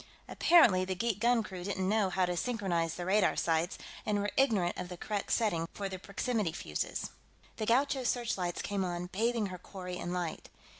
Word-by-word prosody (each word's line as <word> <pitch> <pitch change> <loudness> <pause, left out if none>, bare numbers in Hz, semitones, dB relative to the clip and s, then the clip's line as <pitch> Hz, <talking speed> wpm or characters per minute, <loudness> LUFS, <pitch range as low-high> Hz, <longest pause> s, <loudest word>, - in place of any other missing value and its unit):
Apparently 230 - +5
the 185 0 -2
geek 215 +1 -1
guncrew 220 -6 +1
didn't 190 -1 -1
know 210 -1 +2
how 185 0 +2
to 180 0 -2
synchronize 175 -7 -1
the 175 - -4
radar 200 +2 +3
sights, 165 +1 0 0.3
and 210 -1 0
were 205 0 -1
ignorant 210 -10 +3
of 180 -1 -5
the 180 - -7
correct 205 +2 -3
setting 170 -8 +1
for 200 - -3
the 190 -1 -6
proximity 205 -2 -1
fuses. 75 - -3 0.5
The 215 - -2
Gaucho's 260 +1 +2
searchlights 190 -8 -1
came 200 -1 -1
on, 175 0 -3
bathing 230 +2 +1
her 180 - -7
quarry 180 -1 -7
in 175 - -4
light. 175 -3 -3
190 Hz, 185 wpm, -32 LUFS, 180-220 Hz, 0.5 s, Apparently